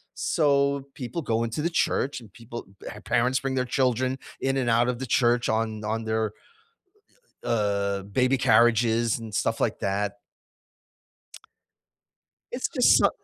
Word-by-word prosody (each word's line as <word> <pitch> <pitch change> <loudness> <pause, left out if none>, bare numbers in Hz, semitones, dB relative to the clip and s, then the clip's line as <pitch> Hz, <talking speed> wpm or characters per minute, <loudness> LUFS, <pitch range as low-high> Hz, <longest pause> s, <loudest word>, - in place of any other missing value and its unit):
So, 140 -3 +1
people 125 +6 -5
go 115 -1 0
into 115 +6 -3
the 170 - +1
church 145 -5 0
and 110 -4 -15
people 120 -1 -9 0.2
eh, 105 - -7
parents 125 +3 +1
bring 135 0 -3
their 130 - 0
children 130 0 +1 0.2
in 135 0 0
and 125 -3 0
out 115 +1 +3
of 125 0 -3
the 130 - -4
church 120 0 +2
on 110 -1 -1
on 110 +1 -2
their, 110 -1 -1 1.1
uh, 100 -3 0 0.2
baby 130 +1 +3
carriages 115 -1 +3
and 110 -2 -9
stuff - - 0
like - - 0
that 100 +1 -1 2.4
It's - - -1
just - - +5
so - - +4
120 Hz, 145 wpm, -26 LUFS, 110-130 Hz, 2.4 s, just